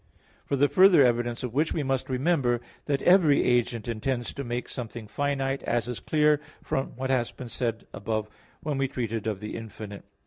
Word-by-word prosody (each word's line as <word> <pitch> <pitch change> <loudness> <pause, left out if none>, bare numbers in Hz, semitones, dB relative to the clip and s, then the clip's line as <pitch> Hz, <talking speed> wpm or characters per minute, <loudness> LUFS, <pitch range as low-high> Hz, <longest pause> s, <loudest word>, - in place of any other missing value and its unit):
For 140 - +1
the 140 +1 +4
further 185 -2 +7
evidence 120 0 0
of 125 -3 -4
which 150 +4 +1
we 155 - -1
must 135 -1 -1
remember 130 -2 +2 0.3
that 140 -2 0
every 175 -6 +5
agent 120 -1 +1
intends 120 +1 -2
to 140 - -5
make 120 0 -3
something 115 -2 -6
finite, 140 +1 -1
as 120 0 -1
is 125 -2 -4
clear 150 -1 +3 0.2
from 135 - -2
what 130 +1 -2
has 125 -3 +1
been 125 - -9
said 115 -1 -2
above 110 +1 -2 0.4
when 145 -3 -1
we 135 - +2
treated 115 -4 -3
of 105 -2 -2
the 105 - -5
infinite 105 -2 -7
(Q. - - -34
125 Hz, 195 wpm, -27 LUFS, 115-140 Hz, 0.4 s, further